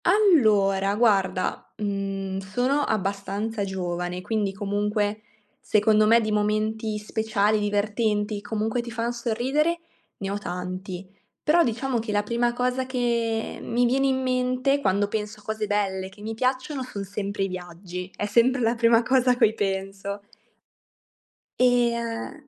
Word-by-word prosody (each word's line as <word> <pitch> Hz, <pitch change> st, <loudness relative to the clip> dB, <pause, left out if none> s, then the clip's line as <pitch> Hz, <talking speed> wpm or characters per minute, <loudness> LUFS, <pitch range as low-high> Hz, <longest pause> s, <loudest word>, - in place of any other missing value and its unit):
Allora, 215 Hz, -, +4 dB
guarda, 195 Hz, -5 st, +1 dB
mhmm, 195 Hz, -2 st, -3 dB
sono 245 Hz, +9 st, 0 dB
abbastanza 200 Hz, 0 st, -2 dB
giovane, 180 Hz, -2 st, -3 dB
quindi, 210 Hz, 0 st, -1 dB
comunque, 205 Hz, +1 st, -1 dB, 0.4 s
secondo 215 Hz, 0 st, +3 dB
me, 230 Hz, +2 st, +6 dB
di 215 Hz, -1 st, -1 dB
momenti 215 Hz, +1 st, 0 dB
speciali, 215 Hz, 0 st, 0 dB
divertenti, 210 Hz, 0 st, 0 dB
comunque, 220 Hz, +3 st, -1 dB
ti 235 Hz, -, -8 dB
fan 230 Hz, +1 st, -2 dB
sorridere, 260 Hz, +8 st, 0 dB, 0.4 s
ne 195 Hz, 0 st, -4 dB
ho 200 Hz, -, -2 dB
tanti. 185 Hz, 0 st, -5 dB, 0.4 s
Però, 335 Hz, +3 st, +5 dB
diciamo 240 Hz, +1 st, -1 dB
che 220 Hz, -1 st, -4 dB
la 205 Hz, 0 st, +1 dB
prima 235 Hz, +3 st, +1 dB
cosa 250 Hz, +1 st, -1 dB
che, 235 Hz, -3 st, -1 dB
ehm, -, -, -10 dB
mi 245 Hz, +1 st, +2 dB
viene 270 Hz, +3 st, +2 dB
in 260 Hz, -1 st, +1 dB
mente 255 Hz, +2 st, +1 dB
quando 200 Hz, -3 st, +2 dB
penso 210 Hz, 0 st, -4 dB
a -, -, -19 dB
cose 220 Hz, 0 st, -3 dB
belle 195 Hz, -2 st, -1 dB
che 195 Hz, +2 st, -16 dB
mi 220 Hz, +1 st, -3 dB
piacciono, 255 Hz, +4 st, -1 dB
son 210 Hz, -6 st, -5 dB
sempre 200 Hz, 0 st, -3 dB
i -, -, +1 dB
viaggi, 180 Hz, 0 st, -7 dB
è 205 Hz, -, -2 dB
sempre 235 Hz, +5 st, +3 dB
la 230 Hz, 0 st, +3 dB
prima 230 Hz, 0 st, +4 dB
cosa 255 Hz, +1 st, +3 dB
a 245 Hz, -, +1 dB
cui 225 Hz, -3 st, +4 dB
penso. 195 Hz, 0 st, -3 dB, 1.4 s
Ehm, 240 Hz, +3 st, +1 dB
215 Hz, 145 wpm, -25 LUFS, 200-240 Hz, 1.4 s, me